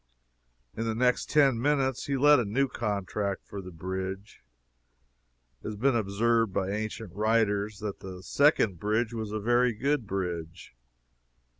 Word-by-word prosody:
In 115 - -3
the 110 -1 -1
next 125 +1 +1
ten 135 -6 +4
minutes 135 -2 +1
he 140 -1 0
let 145 +1 +6
a - - +1
new 120 +7 +1
contract 100 -3 -3
for 100 - -7
the 90 - -9
bridge. 95 +3 -6 1.2
It - - -7
has 105 - -4
been 130 +5 +2
observed 115 +1 +1
by 95 +1 -1
ancient 110 -2 -4
writers 105 -1 +1
that 105 -2 -4
the 95 -1 -9
second 115 - +3
bridge 110 +4 0
was 110 -2 -4
a 110 - -2
very 120 +3 +2
good 135 +1 -1
bridge. 85 -7 -4
110 Hz, 150 wpm, -28 LUFS, 100-120 Hz, 1.2 s, let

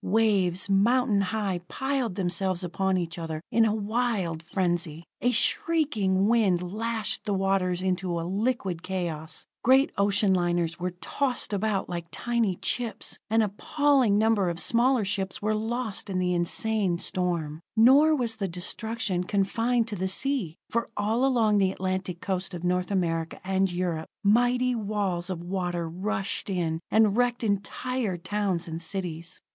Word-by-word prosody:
Waves, 195 -4 +2
mountain 210 +2 +3
high, 195 -2 -1
piled 265 -7 -2
themselves 185 -1 0
upon 190 +2 0
each 170 -1 -3
other 160 -1 -4
in 230 -1 +4
a 215 -1 +1
wild 210 -6 -1
frenzy; 170 -2 -2 0.2
a 245 - +3
shrieking 225 - +1
wind 190 -6 +2
lashed 225 0 -2
the 205 - 0
waters 190 -2 +1
into 180 -2 -1
a 165 - -3
liquid 195 -3 -1
chaos. 170 -4 -4 0.2
Great 265 +3 +5
ocean 200 0 +3
liners 175 -1 0
were 180 +1 -1
tossed 255 +3 -1
about 200 -1 0
like 170 -1 -5
tiny 235 -4 0
chips; 235 +4 -3
an 225 +1 +4
appalling 255 +2 +2
number 215 -4 +3
of 170 0 -3
smaller 235 +6 +2
ships 195 -1 -2
were 215 +1 0
lost 220 -1 -3
in 190 - -1
that 185 - +1
insane 180 +2 +1
storm. 170 -4 -2
Nor 275 +8 +6
was 235 -5 -1
the 200 -3 -1
destruction 190 +2 -2
confined 225 +5 +1
to 210 - -4
the 190 0 -1
sea, 210 - -1
for 235 0 -1
all 220 +4 +1
along 225 -6 +3
the 190 -1 +3
Atlantic 185 -2 -3
coast 190 -1 -2
of 170 - -7
North 180 0 0
America 165 -4 -1
and 190 0 +1
Europe, 175 -3 -2 0.2
mighty 245 +4 +3
walls 200 -5 -1
of 175 -2 -4
water 175 -2 -2
rushed 195 +5 -3
in, 170 -4 -1
and 215 -2 +4
wrecked 245 0 +1
entire 210 +1 -1
towns 185 -1 -2
and 165 0 -5
cities. 170 -2 -5
195 Hz, 150 wpm, -27 LUFS, 180-225 Hz, 0.2 s, Nor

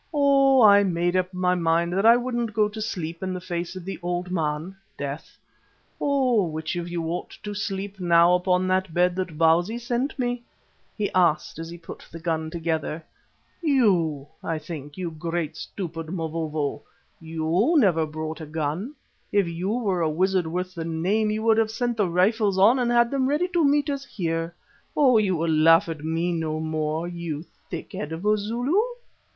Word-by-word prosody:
Oh! 275 -3 +5
I 205 -1 +8
made 175 -1 0
up 185 0 +1
my 180 -1 +1
mind 170 0 +1
that 195 +4 +3
I 235 +1 +8
wouldn't 240 -3 -2
go 215 -1 +3
to 215 +1 -7
sleep 170 -5 -4
in 185 -1 -3
the - - -4
face 175 0 -4
of 185 -2 -8
the 190 -3 -5
Old 175 +1 -3
Man 160 +1 -2 0.2
(death). 140 +1 -6 0.6
Oh! 255 -9 +2
which 155 +2 -4
of 175 0 -4
you 170 -1 -3
ought 175 - -5
to 210 0 -4
sleep 200 -1 -4
now 170 -1 +5
upon 180 0 +2
that 185 -2 0
bed 180 0 +3
that 180 -5 -3
Bausi 170 +7 +3
sent 240 +4 -2
me?" 245 -2 -1 0.6
he 210 -2 -1
asked 175 -3 +2
as 165 0 -6
he 170 - -8
put 165 - -10
the 165 - -8
gun 160 -1 -2
together. 160 -1 -3 0.6
"You, 190 - +2 0.2
I 165 - -2
think, 150 -1 -8
you 180 -2 -3
great 165 0 -3
stupid 165 -4 -6
Mavovo. 160 -4 -3 0.4
You 165 - 0
never 170 - +3
brought 155 +1 -5
a 155 - -7
gun. 160 - -3 0.4
If 200 -3 +2
you 170 +3 -3
were 205 -6 0
a 160 - +2
wizard 185 +2 +1
worth 180 +2 -3
the 170 -3 -5
name 180 +7 0
you 215 +1 -2
would 225 -1 +4
have 220 -1 +2
sent 240 +2 -1
the 205 -4 +1
rifles 195 +3 +2
on 220 +7 +5
and 245 -1 +1
had 235 -1 +3
them 270 -1 +1
ready 305 +5 +1
to 345 -2 +1
meet 290 +1 +3
us 280 -1 -2
here. 165 -2 -3 0.4
Oh! 280 -4 +5
will 230 - +5
you 185 -6 +1
laugh 165 +1 +5
at 160 -2 -6
me 165 +2 -1
any 170 -1 -1
more, 155 0 -2
you 170 -3 -5 0.3
thick 170 - -7
head 150 - -5
of 165 +5 -5
a 210 0 +4
Zulu?" 240 - 0
180 Hz, 190 wpm, -25 LUFS, 165-215 Hz, 0.6 s, I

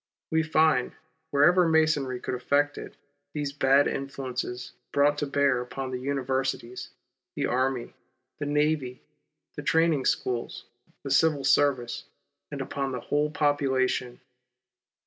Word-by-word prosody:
We 160 0 +3
find, 155 -5 +2 0.4
wherever 170 +5 +4
Masonry 150 -5 +2
could - - -4
effect 140 +4 +1
it, - - -10 0.4
these 145 -2 -3
bad 140 0 +4
influences 130 -2 -4 0.2
brought 145 +1 +3
to 145 - -1
bear 140 -3 +2
upon 130 +1 -5
the 125 - -3
universities, 130 -2 -2 0.5
the - - -1
army, 130 -1 -1 0.5
the 145 - -3
navy, 150 -4 0 0.5
the - - -5
training 160 -4 +2
schools, 120 -2 -1 0.4
the 140 - -5
civil 145 0 +3
service, 135 -3 +2 0.4
and - - -5
upon 135 -1 -3
the 125 - -3
whole 150 +4 0
population. 130 -4 0
140 Hz, 125 wpm, -27 LUFS, 130-145 Hz, 0.5 s, wherever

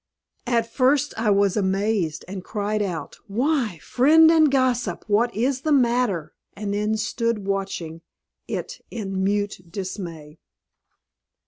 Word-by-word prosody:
At 235 -2 +2
first 265 +5 +2
I 220 -1 0
was 200 -1 +3
amazed, 195 -4 0
and 190 0 -6
cried 210 0 -2
out, 175 -7 -4
"Why, 240 - 0
friend 315 +5 +5
and 315 -2 +5
gossip! 250 -8 0
What 225 +3 +2
is 255 +4 0
the 310 - -1
matter?" 240 - +2 0.2
and 200 0 -3
then 210 +1 0
stood 230 -1 -1
watching 190 -5 -3 0.5
it - - -5
in 195 -4 -3
mute 205 0 0
dismay. 170 -5 -6
210 Hz, 125 wpm, -23 LUFS, 195-245 Hz, 0.5 s, friend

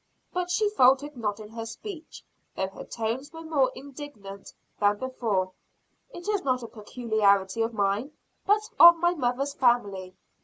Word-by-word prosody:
But 360 0 -2
she 420 +4 +2
faltered 275 -3 +4
not 210 -3 -3
in 210 -1 -10
her 225 0 -6
speech, 335 - -9 0.3
though 190 0 -2
her 195 - -10
tones 235 +5 -4
were 325 0 -9
more 290 -5 +1
indignant 255 -8 -10 0.3
than 205 0 +3
before. 215 -7 -2 0.6
"It 350 -7 -10
is 415 -2 0
not 255 -2 0
a - - -6
peculiarity 215 -3 +1
of 225 +1 0
mine, 205 +6 0 0.3
but 425 +1 +2
of 340 0 +10
my 345 +1 +2
mother's 275 -1 -1
family. 200 -8 +1
245 Hz, 155 wpm, -27 LUFS, 210-295 Hz, 0.6 s, of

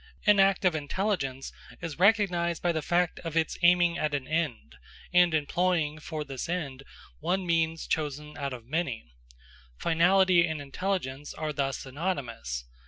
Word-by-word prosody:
An 210 -1 +6
act 195 +1 +4
of 180 - +4
intelligence 145 -4 -2 0.3
is 165 -2 -6
recognised 180 -4 +3
by 175 - +3
the 160 -2 -1
fact 175 +2 +1
of 165 -1 -4
its 160 -1 0
aiming 175 -1 +4
at 150 -1 0
an 135 -2 -4
end, 150 - -2 0.4
and 180 -1 +6
employing 155 0 0
for 155 0 -5
this 135 +1 -6
end 145 -7 -3 0.4
one 185 +1 -1
means 165 -1 0
chosen 150 -1 -3
out 140 -1 -3
of 120 -3 -8
many. 130 - -3 0.6
Finality 175 +1 +4
and 160 -1 -3
intelligence 145 -2 -3
are 155 -1 -3
thus 135 -2 -1
synonymous. 130 - -4
160 Hz, 150 wpm, -28 LUFS, 140-180 Hz, 0.6 s, An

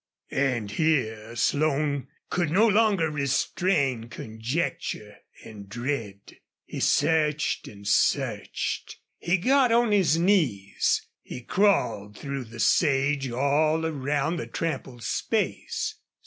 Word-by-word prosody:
And 125 -7 0
here 115 -6 0
Slone 145 +1 +1 0.2
could 175 -3 0
no 205 +8 +4
longer 205 -7 +3
restrain 140 -2 0
conjecture 110 -2 -4 0.3
and 100 -3 -11
dread. 115 -4 -5 0.3
He - - -7
searched 150 -3 +1
and 100 0 -10
searched. 105 - 0 0.2
He 180 +3 +1
got 255 +5 +3
on 235 -1 +3
his 185 -6 +3
knees. 155 - +1 0.2
He 125 - -8
crawled 115 - +1
through 140 -2 -5
the 115 +1 -11
sage 140 -1 +2
all 150 +6 +1
around 150 +1 -1
the - - -5
trampled 135 -7 -4
space. - - -2
140 Hz, 105 wpm, -26 LUFS, 120-165 Hz, 0.3 s, no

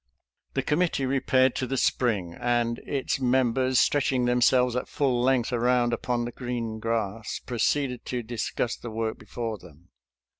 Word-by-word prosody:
The 135 - +1
committee 150 -2 +1
repaired 130 -1 +2
to 130 - -2
the 135 - -2
spring, 105 -10 +1
and 120 +2 0
its 140 -1 -1
mem 130 -2 +2
bers, 130 -1 +2
stretching 130 -3 +2
themselves 125 0 +3
at 125 - -2
full 130 -4 0
length 125 -1 +2
around 120 0 +2
upon 120 0 -1
the 120 - -5
green 120 -3 -4
grass, 110 -1 -2
proceeded 125 +1 0
to 125 -2 -3
discuss 120 +1 -2
the 120 - -8
work 110 0 -3
before 110 0 -5
them. 85 0 -17
120 Hz, 155 wpm, -26 LUFS, 115-130 Hz, -, themselves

